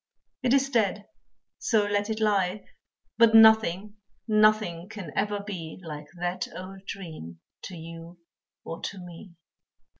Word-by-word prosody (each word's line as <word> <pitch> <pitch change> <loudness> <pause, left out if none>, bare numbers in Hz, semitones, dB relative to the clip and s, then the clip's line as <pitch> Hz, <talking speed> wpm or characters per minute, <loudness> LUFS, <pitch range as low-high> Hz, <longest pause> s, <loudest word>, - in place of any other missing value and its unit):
It 255 -2 +1
is 275 0 +1
dead, 210 -4 +1 0.5
so 220 -3 +2
let 205 +1 0
it 220 0 -2
lie, 200 -2 +1 0.5
But 230 -1 +6
nothing, 220 -2 +5 0.3
nothing 215 -5 +2
can 200 -8 -8
ever 205 0 0
be 180 -6 -7
Like 150 -2 -7
that 175 +1 -3
old 190 +1 -9
dream 155 - -8 0.3
to 185 - -8
you 165 +1 -10 0.5
or 165 - -7
to 200 - -5
me. 175 0 -11
195 Hz, 130 wpm, -27 LUFS, 170-215 Hz, 0.5 s, But